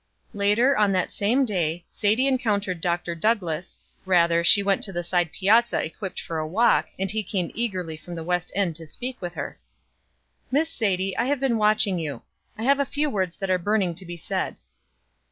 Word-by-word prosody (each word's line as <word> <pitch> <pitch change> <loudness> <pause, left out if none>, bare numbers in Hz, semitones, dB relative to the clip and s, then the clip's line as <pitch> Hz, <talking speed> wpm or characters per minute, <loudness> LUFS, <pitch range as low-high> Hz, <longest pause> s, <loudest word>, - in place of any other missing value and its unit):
Later, 210 +7 +3
on 210 -2 +3
that 185 -1 0
same 240 +7 +2
day, 175 -6 -2
Sadie 220 +6 +1
encountered 205 -9 0
Dr. 175 0 -1
Douglass, 175 -3 -1 0.3
rather, 170 -2 +3
she 200 +4 +6
went 195 -1 +1
to 195 - +1
the 175 -1 -3
side 175 -1 0
piazza 225 +5 +3
equipped 185 +4 -6
for 165 -1 -4
a 155 - -2
walk, 220 +9 +3
and 195 0 -1
he 220 +1 -1
came 185 -3 -2
eagerly 185 -8 -2
from 170 +3 -9
the 165 - -5
west 180 +1 -1
end 190 -5 0
to 165 -2 -10
speak 250 +7 -5
with 175 -1 -5
her. - - -6 0.9
"Miss 305 +5 +1
Sadie, 195 - -1
I - - +2
have 280 +1 0
been 255 -4 +1
watching 210 -3 +3
for - - -2
you. 145 -6 -5 0.4
I 220 - -5
have 275 +3 +3
a - - +4
few 290 +1 -1
words 185 -5 -2
that 195 -1 -2
are 185 - +2
burning 195 -1 +1
to 185 +3 -8
be 175 0 -6
said." 160 - -3
195 Hz, 200 wpm, -24 LUFS, 175-220 Hz, 0.9 s, she